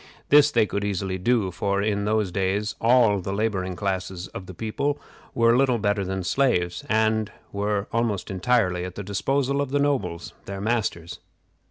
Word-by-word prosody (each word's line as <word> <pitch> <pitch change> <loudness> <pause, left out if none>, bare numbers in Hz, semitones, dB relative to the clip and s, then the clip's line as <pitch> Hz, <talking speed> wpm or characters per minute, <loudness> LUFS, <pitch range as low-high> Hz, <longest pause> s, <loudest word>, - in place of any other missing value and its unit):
This 145 0 +7
they 115 -6 +3
could 100 0 -3
easily 95 -2 -2
do, 105 -1 +1
for 100 +2 -1
in 100 0 0
those 105 -3 +1
days 100 +3 -1
all 115 -3 +4
the 95 +1 -4
laboring 100 -3 -1
classes 95 -2 -3
of 95 - -8
the 95 - -8
people 140 +8 -2 0.4
were 115 0 +4
little 130 -1 +3
better 100 -2 0
than 95 0 -3
slaves, 90 -5 +1
and 110 -1 +1 0.2
were 100 0 -1
almost 115 -6 -1
entirely 95 -2 +1
at 90 0 -6
the 100 - -5
disposal 135 +8 0
of 140 - -2
the 145 - +1
nobles, 100 -13 -1
their 100 0 -6
masters. 100 -6 -2
105 Hz, 170 wpm, -24 LUFS, 95-115 Hz, 0.4 s, This